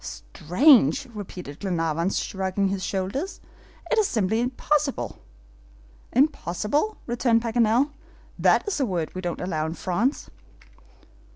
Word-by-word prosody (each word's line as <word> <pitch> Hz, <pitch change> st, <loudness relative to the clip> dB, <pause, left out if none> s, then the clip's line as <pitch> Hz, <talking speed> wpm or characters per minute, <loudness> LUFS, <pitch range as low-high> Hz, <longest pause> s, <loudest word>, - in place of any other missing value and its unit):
"Strange!" 245 Hz, -, +3 dB
repeated 180 Hz, -8 st, -8 dB
Glenarvan, 170 Hz, -2 st, 0 dB
shrugging 195 Hz, 0 st, -1 dB
his 190 Hz, -1 st, -3 dB
shoulders; 200 Hz, -, -3 dB, 0.5 s
"it -, -, +4 dB
is 425 Hz, -, +3 dB
simply 220 Hz, 0 st, 0 dB
impossible." 275 Hz, +3 st, -1 dB, 0.9 s
"Impossible?" 285 Hz, -, +1 dB
returned 235 Hz, -1 st, +1 dB
Paganel. 235 Hz, +4 st, +2 dB, 0.5 s
"That -, -, +3 dB
is 405 Hz, -, -1 dB
a 270 Hz, -, +2 dB
word 175 Hz, -5 st, -2 dB
we 185 Hz, -, -5 dB
don't 175 Hz, -2 st, -3 dB
allow 160 Hz, -4 st, -1 dB
in 160 Hz, -, -5 dB
France." 210 Hz, +12 st, -1 dB
210 Hz, 115 wpm, -25 LUFS, 180-265 Hz, 0.9 s, it